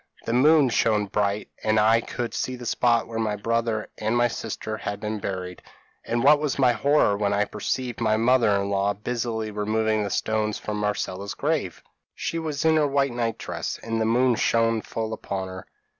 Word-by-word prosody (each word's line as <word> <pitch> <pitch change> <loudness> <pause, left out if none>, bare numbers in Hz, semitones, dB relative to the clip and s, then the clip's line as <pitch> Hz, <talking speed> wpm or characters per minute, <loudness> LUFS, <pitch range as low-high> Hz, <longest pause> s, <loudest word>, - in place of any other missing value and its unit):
The 115 - -1
moon 145 +2 +5
shone 110 -3 +2
bright 100 +1 -1
and 110 0 +3
I 110 +2 +4
could 120 0 -4
see 130 - -2
the 125 -1 -9
spot 120 0 +2
where 115 -1 -5
my 110 -2 0
brother 115 +1 -1
and 110 +3 0
my 120 0 +4
sister 110 -2 -5
had 100 -1 -4
been 105 0 -3
buried; 90 -2 -5 0.4
and 120 +1 -1
what 145 +2 +6
was 150 -2 -1
my 130 -3 +4
horror 130 -2 +3
when 100 0 0
I 105 +1 +2
perceived 125 +1 -3
my 110 -1 +2
mother 120 0 +3
in 100 0 -2
law 100 +1 +1
busily 115 0 -3
removing 110 +1 0
the 100 - -2
stones 110 +1 -1
from 105 0 -4
Marcella's 100 -1 -3
grave! 140 - -2 0.3
"She 165 - -3
was 155 -2 -3
in 160 0 +5
her 150 -1 +3
white 140 -2 +1
night 115 -2 -1
dress - - -5
and 115 0 -2
the - - +2
moon 125 +3 +3
shone 115 -1 +2
full 110 0 -4
upon 95 -3 -4
her. 95 0 -9
110 Hz, 195 wpm, -25 LUFS, 105-120 Hz, 0.4 s, what